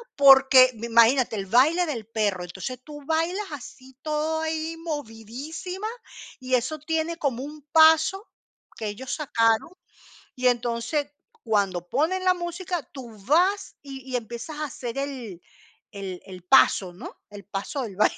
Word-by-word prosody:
porque, 265 -2 +8
imagínate, 235 +2 +3
el 195 - -3
baile 300 - +4
del 235 -8 -4
perro. 205 -5 -1
Entonces, 190 +8 -6
tú 295 0 -10
bailas 330 +6 0
así, 260 -2 -11
todo 310 +1 -1
ahí, 320 0 -3
movidísima, 310 - -6 0.5
y 255 -1 -5
eso 260 +6 -1
tiene 320 +2 -2
como 265 -5 -2
un 300 +1 -9
paso 320 +5 +5 0.5
que 220 - -5
ellos 245 +6 -5
sacaron, 230 -6 +1 0.7
y 255 -1 +2
entonces 245 +5 -1 0.3
cuando 195 -5 0
ponen 350 +8 0
la 365 0 +4
música, 350 -1 -4
tú 240 -6 -10
vas 370 +7 +2
y 270 -2 -10
y - - +1
empiezas 235 +6 -6
a 305 - -2
hacer 255 -3 -6
el 250 -10 -5 0.5
el 195 -3 -6
el 185 -2 -10
paso, 180 +3 +4
¿no? 175 - -10
El 205 -1 -11
paso 205 - -4
del 215 -5 -6
baile. 215 - +2
265 Hz, 145 wpm, -25 LUFS, 225-315 Hz, 0.7 s, porque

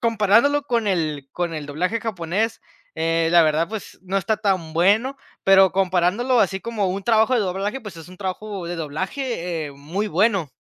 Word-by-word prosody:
comparándolo 230 +6 +3
con 235 -6 -1
el 155 -7 -1
con 175 -2 -2
el 150 -2 -5
doblaje 180 +10 -2
japonés, 215 +2 -2 0.3
eh, 165 0 +1
la 170 -1 +7
verdad, 155 +2 +1
pues 220 -1 -7
no 190 +1 -3
está 205 +3 0
tan 190 -6 -1
bueno. 210 +11 +2 0.3
Pero 190 -2 +6
comparándolo 190 +7 +1
así 190 -1 +1
como 220 -4 -2
un 195 +2 -3
trabajo 225 +3 +3
de 235 - +3
doblaje, 200 +6 -2
pues 205 -6 -9
es 165 +1 -11
un 185 - -13
trabajo 195 0 -5
de 175 0 -4
doblaje, 170 - -3
eh, 140 - -9
muy 165 +10 -4
bueno. 195 -4 +1
190 Hz, 180 wpm, -22 LUFS, 170-220 Hz, 0.3 s, la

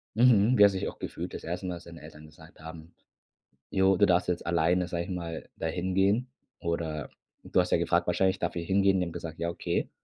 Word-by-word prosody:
Mhm. 120 0 +5
Wie 105 - +8
hast 100 -1 +6
du 95 - -2
dich - - -3
auch - - -7
gefühlt - - -6
das - - -7
1. 90 +3 -4
Mal 90 - -3
als 85 - -11
deine 85 -1 -12
Eltern 75 0 -12
gesagt 80 +1 -17
haben: 80 +1 -10 0.8
„Ja, 95 - +1
du 100 - +4
darfst 90 -2 +2
jetzt 90 -1 -2
alleine, 85 +1 +2
sage 85 0 -2
ich - - -11
mal, 85 -3 -5
da 80 - -3
hingehen?“ 95 +7 +1 0.3
Oder 80 -3 -3 0.3
du - - +1
hast 90 - +1
ja - - +4
gefragt 85 +1 +1
wahrscheinlich: 95 +2 +2
„Darf 85 - -2
ich 85 - -4
hingehen?“ 95 0 +3
Die 90 - 0
haben 85 - -7
gesagt: 80 -1 -7
„Ja, 85 - -1
okay.“ 85 - -2
85 Hz, 235 wpm, -28 LUFS, 85-95 Hz, 0.8 s, Wie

